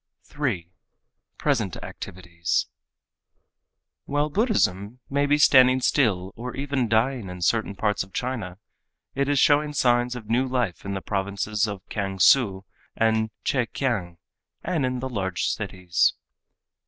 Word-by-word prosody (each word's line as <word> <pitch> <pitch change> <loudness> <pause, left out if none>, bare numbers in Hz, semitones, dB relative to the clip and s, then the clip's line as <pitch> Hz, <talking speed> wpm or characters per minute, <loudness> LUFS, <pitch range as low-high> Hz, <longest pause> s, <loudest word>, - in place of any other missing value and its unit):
3. 115 - -3 0.7
Present 115 - 0
Activities 85 -2 -3 1.4
While 145 +1 0
Buddhism 125 - 0
may 140 +1 +2
be 145 +1 +3
standing 130 -3 +6
still 100 -9 +1
or 125 +2 -6
even 135 -2 -1
dying 115 -1 +1
in 90 -1 -6
certain 105 +2 +1
parts 105 0 0
of 95 - -16
China, 110 -6 -4 0.6
it 140 +1 0
is 145 - +2
showing 150 +2 +3
signs 120 -2 +2
of 115 -4 -8
new 125 +4 +1
life 125 -10 -2
in 100 0 -3
the 95 - -4
provinces 100 +2 -1
of 100 -2 -6
Kiangsu 100 +1 +3 0.3
and 110 0 +2
Chekiang 115 -8 -1 0.5
and 160 -7 0
in 125 -1 -3
the 130 - -3
large 95 -6 -2
cities. 90 -4 0
115 Hz, 130 wpm, -25 LUFS, 95-130 Hz, 1.4 s, standing